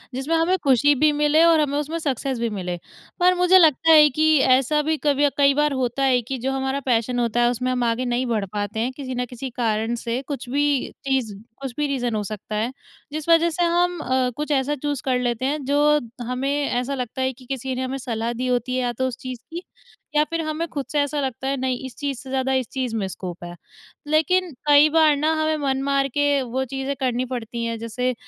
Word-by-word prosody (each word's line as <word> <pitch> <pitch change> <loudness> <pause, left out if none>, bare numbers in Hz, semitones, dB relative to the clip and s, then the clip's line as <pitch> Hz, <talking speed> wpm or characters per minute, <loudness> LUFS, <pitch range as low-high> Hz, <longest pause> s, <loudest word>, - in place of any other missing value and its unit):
जिसमें 275 +6 -1
हमें 345 +3 +2
खुशी 280 +1 +4
भी 300 +3 +3
मिले 295 +2 +3
और 335 -2 +5
हमें 285 -1 0
उसमें 300 +3 -2
सक्सेस 270 -4 -2
भी 235 -1 0
मिले। 180 -4 -4 0.4
पर 360 +1 +5
मुझे 360 +1 +5
लगता 325 -1 +5
है 300 -1 +8
कि 310 +3 +3
ऐसा 265 +3 +3
भी 315 +1 0
कभी 290 0 +3
कई 280 -1 +5
बार 295 0 +1
होता 260 +1 -1
है 255 -2 +3
कि 260 +3 -5
जो 260 +2 -2
हमारा 270 +1 -1
पैशन 245 0 +1
होता 240 0 +1
है 240 - +4
उसमें 250 +1 -2
हम 250 -1 0
आगे 235 +2 0
नहीं 245 +1 0
बढ़ 220 -5 -1
पाते 205 +1 -3
हैं 245 +3 0
किसी 260 -3 -5
न 250 0 -1
किसी 255 +1 -6
कारण 225 -1 -1
से 235 +2 -1
कुछ 270 -4 -5
भी 290 +2 +1 0.4
चीज़ 260 -6 0 0.3
कुछ 270 -3 -5
भी 295 - 0
रीज़न 245 -5 -1
हो 210 - -1
सकता 210 +1 -6
है। 225 +4 -1 0.4
जिस 310 +1 -5
वज़ह 335 0 +5
से 345 +2 -1
हम 350 0 +1
अ, 255 -2 0
कुछ 300 +1 -3
ऐसा 280 +1 +1
चूज़ 290 -1 -3
कर 255 -2 +1
लेते 245 0 -1
हैं 290 +1 -1
जो 295 +2 +3 0.3
हमें 250 +3 -2 0.2
ऐसा 250 +3 -1
लगता 250 0 -4
है 260 0 +1
कि 255 0 -17
किसी 265 0 -4
ने 255 - -3
हमें 260 +1 -3
सलाह 235 -2 -3
दी 250 +2 -3
होती 250 0 0
है 255 - 0
या 245 -1 0
तो 260 +2 -1
उस 250 - -5
चीज़ 255 -2 -6
की 345 +2 -5 0.5
या 300 - +5
फ़िर 330 +1 -3
हमें 310 +2 -3
ख़ुद 280 -2 -3
से 295 - +1
ऐसा 285 +1 0
लगता 265 -1 -3
है 275 0 0
नहीं 255 -1 -1
इस 260 - -8
चीज़ 280 -4 -3
से 265 - -10
ज़्यादा 265 0 0
इस 260 -3 0
चीज़ 255 -4 -3
में 205 -3 -1
स्कोप 180 -2 -7
है। 175 0 -8 0.5
लेक़िन 330 +4 +2 0.2
कई 295 +1 +7
बार 315 -1 +4
ना 305 +3 +1
हमें 310 0 +1
मन 265 0 0
मार 275 0 +1
के 285 -1 +2
वो 255 +1 -2
चीज़ें 270 +2 -4
करनी 255 -1 0
पड़ती 235 -2 -5
हैं, 230 0 -3
जैसे 250 +3 -2
265 Hz, 235 wpm, -22 LUFS, 245-295 Hz, 0.5 s, है